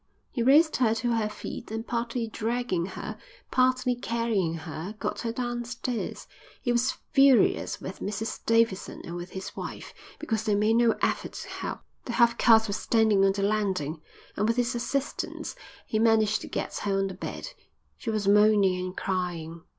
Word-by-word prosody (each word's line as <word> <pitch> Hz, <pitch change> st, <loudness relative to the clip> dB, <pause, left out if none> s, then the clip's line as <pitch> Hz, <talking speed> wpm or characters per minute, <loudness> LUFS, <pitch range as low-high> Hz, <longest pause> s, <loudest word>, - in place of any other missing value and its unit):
He 245 Hz, -, -2 dB
raised 295 Hz, +6 st, +5 dB
her 225 Hz, -3 st, +3 dB
to 235 Hz, +1 st, 0 dB
her 220 Hz, -2 st, 0 dB
feet -, -, -7 dB
and 225 Hz, +1 st, -4 dB
partly 235 Hz, 0 st, -2 dB
dragging 225 Hz, -5 st, -1 dB
her, 215 Hz, +2 st, -7 dB, 0.3 s
partly 255 Hz, 0 st, +3 dB
carrying 230 Hz, -8 st, -1 dB
her, 165 Hz, +4 st, -6 dB
got -, -, -3 dB
her 230 Hz, -, -2 dB
downstairs. 240 Hz, 0 st, -4 dB, 0.3 s
He 245 Hz, -, -1 dB
was 240 Hz, +1 st, +2 dB, 0.2 s
furious 275 Hz, -6 st, +4 dB
with 190 Hz, -, -7 dB
Mrs 215 Hz, +2 st, -4 dB
Davidson 230 Hz, -4 st, +1 dB
and 170 Hz, -, -6 dB
with 175 Hz, +1 st, -6 dB
his 190 Hz, -, -6 dB
wife -, -, -7 dB, 0.2 s
because 225 Hz, -8 st, -2 dB
they 215 Hz, -2 st, +2 dB
made 215 Hz, +2 st, +3 dB
no 235 Hz, -1 st, +4 dB
effort -, -, 0 dB
to -, -, -7 dB
help. -, -, -5 dB, 0.2 s
The 240 Hz, -, -4 dB
half 235 Hz, -1 st, +4 dB
caste 225 Hz, -2 st, +6 dB
was 200 Hz, -, -2 dB
standing 220 Hz, -4 st, +3 dB
on 195 Hz, 0 st, +4 dB
the 200 Hz, 0 st, -2 dB
landing 190 Hz, -7 st, 0 dB, 0.3 s
and 210 Hz, -, +1 dB
with 230 Hz, +1 st, +1 dB
his 245 Hz, +1 st, +1 dB
assistance 265 Hz, +3 st, -3 dB, 0.3 s
he 215 Hz, -, -1 dB
managed 220 Hz, -1 st, +3 dB
to -, -, -7 dB
get -, -, -4 dB
her 200 Hz, -1 st, 0 dB
on 195 Hz, -, +1 dB
the 190 Hz, -, -4 dB
bed. 185 Hz, -, -6 dB, 0.5 s
She 230 Hz, -, -4 dB
was 215 Hz, -2 st, -1 dB
moaning 200 Hz, -3 st, +5 dB
and 185 Hz, 0 st, -6 dB
crying. 175 Hz, -3 st, -3 dB
220 Hz, 175 wpm, -27 LUFS, 195-235 Hz, 0.5 s, caste